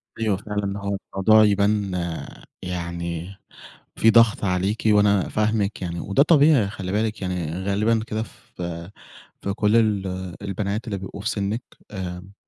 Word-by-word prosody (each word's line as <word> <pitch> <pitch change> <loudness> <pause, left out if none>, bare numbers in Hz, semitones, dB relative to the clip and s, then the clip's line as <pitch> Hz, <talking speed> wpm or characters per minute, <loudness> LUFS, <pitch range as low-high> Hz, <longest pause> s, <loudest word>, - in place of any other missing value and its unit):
أيوه 110 -4 0
فعلًا، 100 -1 -3
هو 100 0 -2 0.2
الموضوع 110 +3 +5
يبان 100 -1 +2 0.7
يعني 85 0 -4 0.6
في 115 - +4
ضغط 115 -2 +5
عليكِ، 95 +3 0
وأنا 105 -2 +4
فاهمِك 105 -2 0
يعني 85 -1 -3
وده 100 +9 +3
طبيعي 145 - +5
خلّي 95 -3 -5
بالِك 110 0 -1
يعني 90 -4 -2
غالبًا 110 +3 +2
كده 110 +1 -2
في 85 -3 -8 0.5
في 100 - -2
كل 105 +2 +2
ال 105 -4 +2 0.4
البنات 100 +3 -3
اللي 100 -2 -2
بيبقوا 95 +1 -8
في - - -1
سِنّك، 105 +4 -2 0.3
آمم 95 0 -6
100 Hz, 140 wpm, -23 LUFS, 95-110 Hz, 0.7 s, الموضوع